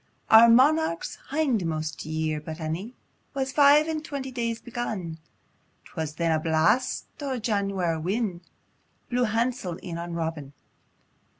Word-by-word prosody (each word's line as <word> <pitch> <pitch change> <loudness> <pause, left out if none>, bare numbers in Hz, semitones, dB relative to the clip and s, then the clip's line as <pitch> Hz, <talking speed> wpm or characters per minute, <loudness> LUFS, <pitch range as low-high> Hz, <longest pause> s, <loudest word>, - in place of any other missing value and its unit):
Our 225 +1 +9
monarch's 260 - +3
hindmost 185 - -1
year 155 -1 -2
but 155 +1 -7
ane 170 +10 -4 0.4
Was 265 -1 -1
five 290 +2 +6
and 315 -1 -2
twenty 275 -3 -5
days 230 -2 -2
begun^2, 205 -9 -5 0.7
'Twas 155 -1 -5
then 165 0 0
a 160 - +2
blast 160 +10 +1 0.2
o' 270 -3 -2
Janwar' 195 -7 -1
win' 190 0 -1 0.7
Blew 245 0 +2
hansel 225 -5 -1
in 170 -1 -7
on 170 0 -5
Robin. 160 -4 -4
200 Hz, 125 wpm, -26 LUFS, 160-250 Hz, 0.7 s, Our